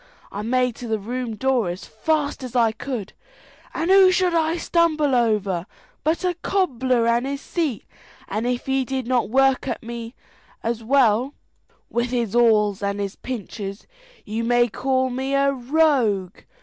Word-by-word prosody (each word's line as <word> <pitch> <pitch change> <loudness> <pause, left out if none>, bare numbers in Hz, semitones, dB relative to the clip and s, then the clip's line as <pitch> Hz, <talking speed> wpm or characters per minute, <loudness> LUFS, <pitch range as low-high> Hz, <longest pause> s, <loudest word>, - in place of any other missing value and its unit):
I 200 - -5
made 250 +1 +1
to 245 - -7
the 220 -1 0
room 235 +2 -4
door 255 -5 +1
as 175 +2 -6
fast 290 +6 -1
as 255 -1 -7
I 230 -2 +4
could, 225 -3 -5 0.6
and 330 +3 -1
who 385 -1 +7
should 365 -1 +2
I 325 0 +1
stumble 315 -5 +2
over 210 -7 +1 0.4
but 320 +4 0
a 360 - +1
cobbler 260 -10 0
and 235 +2 +2
his 280 0 -3
seat, 310 - -2 0.4
and 215 +4 -2
if 245 0 -2
he 265 0 +1
did 260 -1 -3
not 245 -2 +1
work 270 +2 +3
at - - -3
me 235 +1 -7 0.5
with 235 0 -1
his 235 -3 -1
awls 215 -4 +3
and 200 0 -2
his 200 -1 -3
pinchers 205 -4 -6 0.4
you 220 +2 -3
may 240 +1 +3
call 260 +2 0
me 265 +2 -2
a 275 0 +3
rogue. 250 - +1
245 Hz, 155 wpm, -22 LUFS, 220-275 Hz, 0.6 s, who